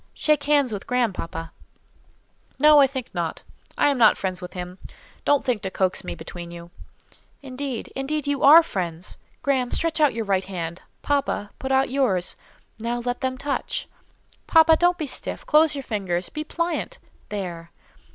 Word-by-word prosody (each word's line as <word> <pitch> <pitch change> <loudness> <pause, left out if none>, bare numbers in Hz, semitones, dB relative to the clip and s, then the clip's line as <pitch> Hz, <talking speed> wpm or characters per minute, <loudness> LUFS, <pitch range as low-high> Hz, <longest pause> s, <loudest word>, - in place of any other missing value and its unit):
Shake 300 -2 +1
hands 285 -5 +3
with 205 - -6
Graham, 245 -4 +1
papa." 165 -1 -6 1.1
"No: 300 +1 +7
I 275 - +7
think 260 -2 -6
not: 170 -2 -3 0.3
I - - +4
am 275 - -2
not 220 -2 +6
friends 185 -1 -3
with 180 - -8
him. 180 0 -7 0.5
Don't 290 -1 +3
think 240 -5 0
to 190 - -3
coax 185 0 -1
me - - -5
between 170 +1 -8
you." 170 0 -10 0.7
"Indeed, 265 -2 -5
indeed, 290 +2 -2
you 285 -1 -1
are 315 +4 +9
friends. 175 - -4 0.2
Graham, 265 -4 +1
stretch 330 +2 0
out 295 -6 +4
your 225 -1 -2
right 195 -1 +1
hand. 170 -2 -5 0.2
Papa, 280 -7 -1
put 265 - -3
out 265 -1 +2
yours. 235 -10 +1 0.4
Now, 235 +2 -2
let 245 0 -2
them 260 -1 -1
touch. 280 +1 -3 0.6
Papa, 325 -1 +6
don't 350 +2 +3
be 315 - -3
stiff; 275 - -3
close 305 0 +4
your 275 - -4
fingers; 190 -6 -2
be 305 - -5
pliant—there! 205 - -5
250 Hz, 165 wpm, -24 LUFS, 185-285 Hz, 1.1 s, are